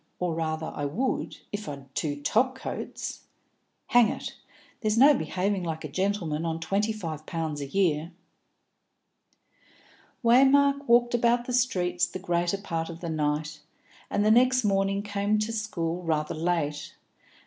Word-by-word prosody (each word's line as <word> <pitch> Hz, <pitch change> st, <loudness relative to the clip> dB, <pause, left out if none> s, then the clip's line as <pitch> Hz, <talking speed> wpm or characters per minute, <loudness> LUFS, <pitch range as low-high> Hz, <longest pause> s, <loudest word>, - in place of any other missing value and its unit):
Or, 180 Hz, -2 st, -1 dB
rather, 160 Hz, 0 st, -2 dB
I 145 Hz, -, -3 dB
would, 220 Hz, -, -2 dB
if 205 Hz, 0 st, -5 dB
I'd 140 Hz, -2 st, -9 dB
two 145 Hz, -2 st, -3 dB
top 255 Hz, -, +2 dB
coats. 265 Hz, -, -6 dB, 0.6 s
Hang 245 Hz, -3 st, +6 dB
it! -, -, -5 dB, 0.5 s
There's 215 Hz, -1 st, 0 dB
no 280 Hz, +5 st, +8 dB
behaving 190 Hz, -, -1 dB
like 160 Hz, -2 st, -4 dB
a -, -, -3 dB
gentleman 170 Hz, -1 st, -1 dB
on 165 Hz, -1 st, -2 dB
twenty 200 Hz, +6 st, 0 dB
five 160 Hz, -8 st, -6 dB
pounds 160 Hz, -4 st, -3 dB
a 140 Hz, -, -4 dB
year." 165 Hz, -1 st, +1 dB, 2.1 s
Waymark 275 Hz, +4 st, +5 dB
walked 240 Hz, +1 st, +4 dB
about 240 Hz, 0 st, +2 dB
the 250 Hz, -, -4 dB
streets 180 Hz, -8 st, +1 dB
the -, -, -6 dB
greater 175 Hz, 0 st, 0 dB
part 165 Hz, -5 st, -3 dB
of 165 Hz, 0 st, -8 dB
the 170 Hz, -, -4 dB
night, 155 Hz, 0 st, -1 dB, 0.5 s
and 205 Hz, -, +1 dB
the 215 Hz, -, +5 dB
next 255 Hz, +2 st, +4 dB
morning 195 Hz, 0 st, +1 dB
came 205 Hz, 0 st, 0 dB
to 215 Hz, +2 st, -1 dB
school 180 Hz, -6 st, -2 dB
rather 155 Hz, -3 st, -1 dB
late. 155 Hz, -3 st, -2 dB
Dr. -, -, -35 dB
185 Hz, 150 wpm, -27 LUFS, 160-220 Hz, 2.1 s, no